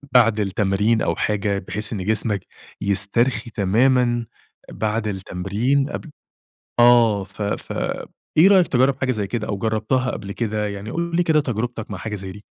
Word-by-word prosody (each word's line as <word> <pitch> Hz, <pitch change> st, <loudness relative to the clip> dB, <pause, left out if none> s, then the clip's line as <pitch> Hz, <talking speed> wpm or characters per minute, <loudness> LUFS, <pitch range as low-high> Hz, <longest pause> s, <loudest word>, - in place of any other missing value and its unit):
بعد 115 Hz, -3 st, +5 dB
التمرين 105 Hz, +2 st, +1 dB
أو -, -, 0 dB
حاجة، 100 Hz, -1 st, 0 dB
بحيث 105 Hz, +4 st, -5 dB
إن 95 Hz, -3 st, -4 dB
جسمك 105 Hz, -3 st, 0 dB, 0.4 s
يسترخي 105 Hz, +5 st, +1 dB
تمامًا 120 Hz, +4 st, +2 dB, 0.5 s
بعد 110 Hz, 0 st, -1 dB
التمرين، 105 Hz, +8 st, -1 dB
قبل 160 Hz, -, -7 dB, 0.7 s
آه 115 Hz, -4 st, +5 dB
ف 95 Hz, +2 st, -9 dB
ف 100 Hz, -, -3 dB, 0.7 s
إيه 170 Hz, +5 st, +8 dB
رأيك 190 Hz, -3 st, +5 dB
تجرَّب 130 Hz, +1 st, +3 dB
حاجة 130 Hz, -, +1 dB
زي 105 Hz, -4 st, -2 dB
كده، 115 Hz, +4 st, -3 dB
أو 100 Hz, -, -2 dB
جرَّبتها 110 Hz, +4 st, 0 dB
قبل 100 Hz, -4 st, -5 dB
كده؟ 105 Hz, -1 st, -2 dB
يعني 100 Hz, +2 st, -6 dB
قُل 170 Hz, +2 st, -2 dB
لي 175 Hz, -, +4 dB
كده 160 Hz, -3 st, +3 dB
تجربتك 120 Hz, -4 st, -3 dB
مع 95 Hz, -, -5 dB
حاجة 110 Hz, +1 st, -5 dB
زي 95 Hz, -1 st, -7 dB
دي؟ 105 Hz, +2 st, -13 dB
110 Hz, 160 wpm, -22 LUFS, 100-125 Hz, 0.7 s, إيه